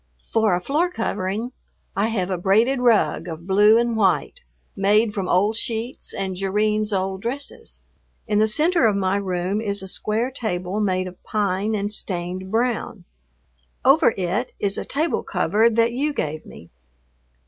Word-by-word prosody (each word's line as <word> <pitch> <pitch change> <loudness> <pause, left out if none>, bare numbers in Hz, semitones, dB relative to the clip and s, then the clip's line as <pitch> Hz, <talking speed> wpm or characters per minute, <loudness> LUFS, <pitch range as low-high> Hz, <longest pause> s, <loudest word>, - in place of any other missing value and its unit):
For 220 -5 +2
a 180 - -2
floor 305 - +1
covering 225 - -3 0.4
I 200 +3 +1
have 195 -5 -2
a 185 - 0
braided 225 +8 +3
rug 235 -6 +2
of 165 0 -7
blue 205 +3 +5
and 235 0 +1
white, 215 - +1 0.3
made 210 +2 +3
from 195 -3 -3
old 205 +5 +2
sheets 230 +2 -4
and 190 -1 -3
Jerrine's 210 +3 0
old 190 -1 -1
dresses. 270 +6 -6 0.4
In 210 -2 +1
the 215 - +4
center 310 +4 +3
of 210 - +1
my 195 0 +1
room 190 +1 -2
is 200 -3 0
a - - -7
square 220 +6 -1
table 190 -5 -3
made 185 -3 0
of 185 0 -10
pine 205 0 -1
and 205 0 -2
stained 185 -1 -4
brown. 225 -3 -1 0.8
Over 270 -3 +5
it 195 +7 -2
is 200 -1 +1
a - - -4
table 310 +4 0
cover 220 +3 +2
that 230 +1 +2
you 290 +4 -1
gave 155 - -4
me. 85 - -13
210 Hz, 160 wpm, -22 LUFS, 190-230 Hz, 0.8 s, blue